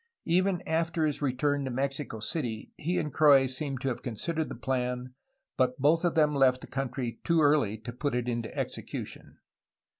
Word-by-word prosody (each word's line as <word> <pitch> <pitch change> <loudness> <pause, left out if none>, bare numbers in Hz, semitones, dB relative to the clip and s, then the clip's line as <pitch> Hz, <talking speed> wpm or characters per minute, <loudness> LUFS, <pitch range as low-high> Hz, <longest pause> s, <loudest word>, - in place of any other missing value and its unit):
Even 185 +1 +2
after 165 0 +1
his 150 -1 -1
return 145 +1 +1
to 135 - -3
Mexico 135 -2 -2
City 110 -1 -3
he 175 +4 -2
and 150 -3 -2
Croix 145 -3 +6
seem 135 +1 -3
to 130 - -4
have 125 - -2
considered 155 +7 -2
the - - -5
plan, 125 -1 -2 0.4
but 130 -1 +2
both 155 +5 +3
of 175 - +1
them 150 -2 +4
left 130 -2 +3
the - - -8
country 125 -3 -4
too 170 -1 +3
early 145 -8 +3
to 120 +2 -8
put 135 +1 -2
it 125 0 -1
into 115 -2 -2
execution. - - -5
135 Hz, 180 wpm, -29 LUFS, 125-155 Hz, 0.4 s, Croix